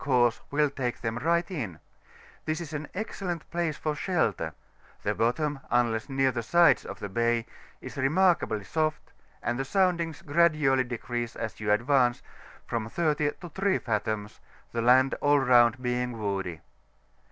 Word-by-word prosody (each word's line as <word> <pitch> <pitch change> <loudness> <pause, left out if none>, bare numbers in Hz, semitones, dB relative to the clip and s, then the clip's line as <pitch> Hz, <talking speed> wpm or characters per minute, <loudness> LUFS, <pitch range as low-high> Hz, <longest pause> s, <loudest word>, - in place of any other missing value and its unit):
course 125 -4 +2
will 145 0 +2
take 125 -3 -3
them 115 0 -2
right 170 +4 +1
in; 115 - -4 0.7
this 155 +1 -1
is 160 -3 -7
an 150 0 -4
excellent 185 -5 -4
place 170 -3 -1
for 155 - -2
shelter: 155 - 0 0.5
the - - +1
bottom, 140 +5 0
unless 120 0 +1
near 135 -1 +2
the 120 -1 -3
sides 170 +9 +4
of 100 - -7
the 100 - -5
bay, 115 +2 +1 0.4
is - - -9
remarkably 155 - +2
soft, 155 +5 -2 0.3
and 120 +1 -1
the - - 0
soundings 170 +1 0
gradually 150 -4 +3
decrease 120 -1 -4
as 110 -1 -5
you 105 -1 0
advance, 120 +2 +2 0.4
from 115 -1 -3
30 150 0 0
to 175 - -7
3 190 +4 +1
fathoms, 105 -1 -3 0.3
the 115 - -1
land 130 +3 +5
all 145 0 +4
round 125 -2 +5
being 125 -1 -1
woody. 95 -5 -3
130 Hz, 150 wpm, -28 LUFS, 115-155 Hz, 0.7 s, land